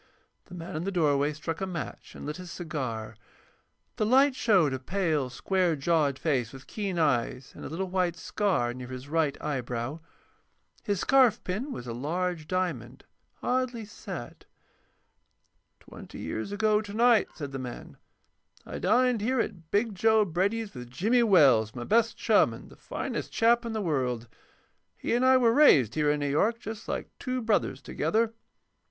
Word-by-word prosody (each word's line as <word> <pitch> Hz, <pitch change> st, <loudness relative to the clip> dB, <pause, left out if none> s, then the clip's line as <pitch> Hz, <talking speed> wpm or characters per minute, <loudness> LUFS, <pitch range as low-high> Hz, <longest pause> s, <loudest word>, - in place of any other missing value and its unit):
The 180 Hz, -, -11 dB
man 165 Hz, -2 st, -7 dB
in 155 Hz, -, -2 dB
the 195 Hz, -, -2 dB
doorway 145 Hz, -5 st, +2 dB
struck 155 Hz, +3 st, -5 dB
a 190 Hz, -, -1 dB
match 170 Hz, -5 st, -6 dB
and -, -, -8 dB
lit 150 Hz, +1 st, -4 dB
his 180 Hz, -1 st, -9 dB
cigar. 125 Hz, -11 st, -5 dB, 0.8 s
The 215 Hz, -, +1 dB
light 270 Hz, +4 st, +5 dB
showed 185 Hz, -, +3 dB
a 130 Hz, -, -3 dB
pale, 155 Hz, -3 st, -1 dB
square 180 Hz, +4 st, 0 dB
jawed 145 Hz, -2 st, +1 dB
face 130 Hz, -8 st, 0 dB
with 135 Hz, 0 st, -12 dB
keen 200 Hz, -4 st, -4 dB
eyes, 130 Hz, -4 st, 0 dB
and -, -, -10 dB
a -, -, -6 dB
little 185 Hz, +5 st, -3 dB
white 180 Hz, -2 st, 0 dB
scar 175 Hz, -, 0 dB
near 125 Hz, 0 st, -8 dB
his 130 Hz, +1 st, -8 dB
right 155 Hz, -2 st, 0 dB
eyebrow. 125 Hz, 0 st, -3 dB, 0.8 s
His 200 Hz, -2 st, -1 dB
scarfpin 250 Hz, -2 st, +2 dB
was 120 Hz, -, -6 dB
a 120 Hz, -, -5 dB
large 160 Hz, +5 st, -2 dB
diamond, 155 Hz, -10 st, -3 dB, 0.4 s
oddly 250 Hz, -3 st, -1 dB
set. 195 Hz, -, -8 dB, 1.4 s
"Twenty -, -, -12 dB
years 110 Hz, -, -4 dB
ago 210 Hz, +1 st, +2 dB
to 205 Hz, -1 st, -8 dB
night," 235 Hz, -1 st, +4 dB
said 145 Hz, -3 st, -6 dB
the 135 Hz, -, -5 dB
man, 125 Hz, -2 st, -8 dB, 0.7 s
"I -, -, -6 dB
dined 245 Hz, +3 st, +3 dB
here 255 Hz, +4 st, +1 dB
at 175 Hz, -8 st, -3 dB
'Big 210 Hz, +3 st, +1 dB
Joe' 220 Hz, +2 st, +3 dB
Brady's 200 Hz, +5 st, -1 dB
with 125 Hz, -1 st, -9 dB
Jimmy 220 Hz, -, +2 dB
Wells, 135 Hz, -, +5 dB
my 120 Hz, -, -5 dB
best 230 Hz, -, +2 dB
chum, -, -, +3 dB
and -, -, -13 dB
the -, -, -14 dB
finest -, -, -5 dB
chap 235 Hz, +1 st, +3 dB
in 230 Hz, -, -4 dB
the 220 Hz, -, -2 dB
world. 125 Hz, -8 st, -1 dB, 0.7 s
He -, -, -2 dB
and 240 Hz, +2 st, +2 dB
I 260 Hz, 0 st, +6 dB
were 235 Hz, -3 st, +4 dB
raised 140 Hz, -, +6 dB
here 150 Hz, -1 st, +1 dB
in 145 Hz, 0 st, +1 dB
New 145 Hz, -, 0 dB
York, 220 Hz, +11 st, +2 dB
just 220 Hz, -1 st, -7 dB
like -, -, -4 dB
two 255 Hz, -1 st, -2 dB
brothers, 210 Hz, -, 0 dB
together. 220 Hz, +8 st, 0 dB
175 Hz, 170 wpm, -28 LUFS, 140-220 Hz, 1.4 s, I